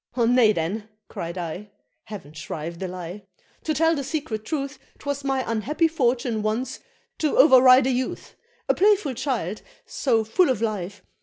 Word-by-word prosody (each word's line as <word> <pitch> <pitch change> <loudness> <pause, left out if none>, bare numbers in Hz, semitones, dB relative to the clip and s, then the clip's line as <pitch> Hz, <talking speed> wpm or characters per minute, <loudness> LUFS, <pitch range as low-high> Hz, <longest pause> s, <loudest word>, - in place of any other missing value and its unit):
"Nay 235 -1 +5
then," 205 +4 -3 0.2
cried 170 +2 -6
I 180 +4 -5 0.4
(heav'n 195 -9 -9
shrive 155 +2 -6
the 190 - -3
lie!) 180 +2 -7 0.4
"to 315 - -1
tell 325 +2 +3
the 280 - -3
secret 270 -8 -4
truth, 280 +3 -4 0.2
'Twas 285 -1 -4
my 270 -1 0
unhappy 250 - 0
fortune 245 -7 0
once 220 +5 -2 0.4
to 305 -2 0
over 260 -2 +8
ride 255 0 +7
a 265 - +2
youth! 255 0 -3 0.3
A - - +4
playful 395 -7 +3
child, 225 - -3 0.2
so 230 -5 +1
full 300 - +2
of 255 - +1
life! 205 -3 -3
235 Hz, 160 wpm, -24 LUFS, 205-275 Hz, 0.4 s, over